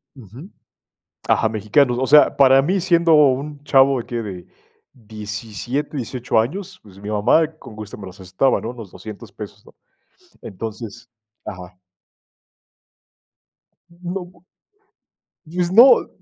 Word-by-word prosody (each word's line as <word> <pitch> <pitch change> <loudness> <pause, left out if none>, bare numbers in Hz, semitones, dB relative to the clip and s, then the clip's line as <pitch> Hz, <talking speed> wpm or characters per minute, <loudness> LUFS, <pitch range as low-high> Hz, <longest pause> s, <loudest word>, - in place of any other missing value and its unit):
Ujú. 130 - -13 0.8
Ajá, 110 - +2
mexicanos. 115 +4 +1
O 130 - 0
sea, 150 +3 +5
para 135 -1 +6
mí 185 +7 0
siendo 170 -2 +3
un 145 0 +2
chavo 135 -2 +4
de - - -7
qué, 120 - -7
de 95 -5 -8 0.5
17, 110 +5 -6
18 125 -2 -1
años, 185 - -4
pues, 100 -2 -16
mi 105 +1 -8
mamá 110 +10 +3
con 110 - -13
gusto 105 -1 -9
me 100 - -9
los 95 +1 -11
prestaba, 95 +8 0
¿no? 115 - -5
Los 115 -6 -11
$200 110 -2 -11
pesos, - - -11
¿no? - - -18 0.7
Entonces 115 +3 -8 0.4
ajá. 90 -3 -9 2.1
No 175 +1 -7 1.2
y 175 +3 -5
es 175 0 0
no 240 +7 +7
125 Hz, 130 wpm, -20 LUFS, 105-150 Hz, 2.1 s, no